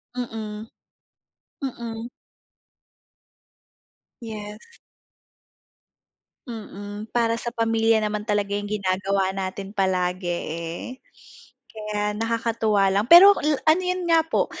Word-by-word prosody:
Mm. 220 Hz, -3 st, -5 dB, 1.0 s
Mm. 235 Hz, -3 st, -5 dB, 2.1 s
Yes. 215 Hz, -, -9 dB, 1.7 s
Mm. 210 Hz, -2 st, -8 dB
Para 230 Hz, -1 st, +1 dB
sa 235 Hz, +1 st, -4 dB
pamilya 225 Hz, -1 st, +2 dB
naman 210 Hz, -1 st, -2 dB
talaga 205 Hz, -2 st, 0 dB
yung 205 Hz, 0 st, -4 dB
ginagawa 195 Hz, -1 st, 0 dB
natin 195 Hz, +1 st, -5 dB
palagi, 185 Hz, -1 st, 0 dB
eh. 170 Hz, 0 st, -4 dB, 1.0 s
Kaya 210 Hz, -1 st, -2 dB
nakakatuwa 225 Hz, -2 st, +1 dB
lang, 195 Hz, +2 st, +2 dB
pero 380 Hz, +4 st, +10 dB
la 295 Hz, -1 st, +1 dB
ano 320 Hz, +4 st, +5 dB
yun 365 Hz, -1 st, -2 dB
nga 330 Hz, -1 st, +5 dB
po, 325 Hz, -, 0 dB
215 Hz, 95 wpm, -24 LUFS, 200-230 Hz, 2.1 s, pero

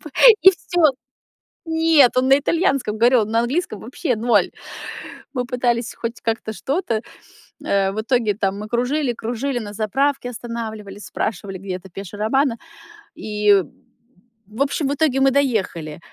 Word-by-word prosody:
П 305 Hz, -, -8 dB, 0.3 s
и 380 Hz, -, +10 dB
всё. 350 Hz, -3 st, +2 dB, 0.8 s
Нет, 320 Hz, -6 st, +4 dB
он 255 Hz, -, +3 dB
на 270 Hz, -, +7 dB
итальянском 280 Hz, -, 0 dB
говорил, 240 Hz, +2 st, +5 dB
он 215 Hz, -, -3 dB
на 230 Hz, -, +3 dB
английском 240 Hz, -, -1 dB
вообще 255 Hz, -, -2 dB
0. 220 Hz, -4 st, +2 dB, 0.8 s
Мы 250 Hz, -2 st, -2 dB
пытались 240 Hz, -2 st, -1 dB
хоть 230 Hz, 0 st, -5 dB
как-то 225 Hz, -1 st, -2 dB
что-то. 265 Hz, -, -2 dB, 0.7 s
Э, 195 Hz, -1 st, +1 dB
в -, -, -8 dB
итоге 230 Hz, -2 st, +1 dB
там 200 Hz, -1 st, -1 dB
мы 210 Hz, -, -7 dB
кружили, 250 Hz, +3 st, 0 dB
кружили, 245 Hz, +3 st, -3 dB
на 205 Hz, -2 st, -7 dB
заправке 250 Hz, +5 st, 0 dB
останавливались, 220 Hz, -4 st, -7 dB
спрашивали, 195 Hz, -2 st, -4 dB
где 195 Hz, -, -13 dB
это 190 Hz, +1 st, -15 dB
Пеша 195 Hz, +2 st, -9 dB
Романа. 235 Hz, +3 st, +1 dB, 0.6 s
И, 210 Hz, -2 st, +2 dB, 0.8 s
в 220 Hz, +7 st, -2 dB
общем, 280 Hz, 0 st, -1 dB
в 280 Hz, -, 0 dB
итоге 285 Hz, -3 st, +1 dB
мы 270 Hz, 0 st, +5 dB
доехали. 200 Hz, -, -1 dB
235 Hz, 150 wpm, -21 LUFS, 210-270 Hz, 0.8 s, и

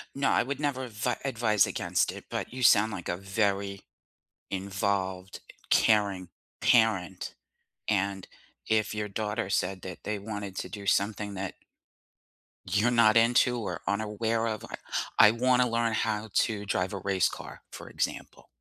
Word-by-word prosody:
No, 140 Hz, 0 st, +1 dB
I -, -, +3 dB
would 140 Hz, +2 st, -4 dB
never 130 Hz, -3 st, -1 dB
advi 115 Hz, +2 st, -2 dB
advise 110 Hz, -7 st, +2 dB
against -, -, 0 dB
it, -, -, -10 dB
but -, -, -4 dB
you 130 Hz, 0 st, -4 dB
sound, 110 Hz, -1 st, +6 dB
like, 90 Hz, -4 st, -6 dB
a 85 Hz, -, -1 dB
very 100 Hz, 0 st, -1 dB, 0.7 s
involved, 95 Hz, -1 st, -2 dB, 0.3 s
caring 100 Hz, -4 st, +3 dB, 0.3 s
parent. 105 Hz, -6 st, +2 dB, 0.5 s
And 100 Hz, -2 st, 0 dB, 0.4 s
if 110 Hz, -1 st, +1 dB
your 105 Hz, 0 st, -3 dB
daughter 105 Hz, 0 st, -3 dB
said 95 Hz, -1 st, -1 dB
that 90 Hz, -2 st, -7 dB
they 105 Hz, 0 st, -2 dB
wanted 100 Hz, -2 st, -6 dB
to -, -, -4 dB
do 100 Hz, -2 st, -8 dB
something 100 Hz, +1 st, 0 dB
that 95 Hz, 0 st, -4 dB, 1.2 s
you're 105 Hz, +6 st, +3 dB
not 115 Hz, -2 st, +5 dB
into 120 Hz, +1 st, +4 dB
or 90 Hz, -6 st, -4 dB
unaware 110 Hz, +2 st, 0 dB
of, 110 Hz, -2 st, -4 dB
I -, -, -6 dB, 0.4 s
I 105 Hz, -, +8 dB
wanna 125 Hz, +1 st, +2 dB
learn 115 Hz, -1 st, +1 dB
how 110 Hz, 0 st, -1 dB
to 105 Hz, -2 st, +1 dB
drive 95 Hz, -1 st, -1 dB
a 100 Hz, -, -4 dB
race 95 Hz, -1 st, +1 dB
car, -, -, -9 dB
for -, -, -9 dB
example -, -, -4 dB
105 Hz, 150 wpm, -28 LUFS, 100-115 Hz, 1.2 s, I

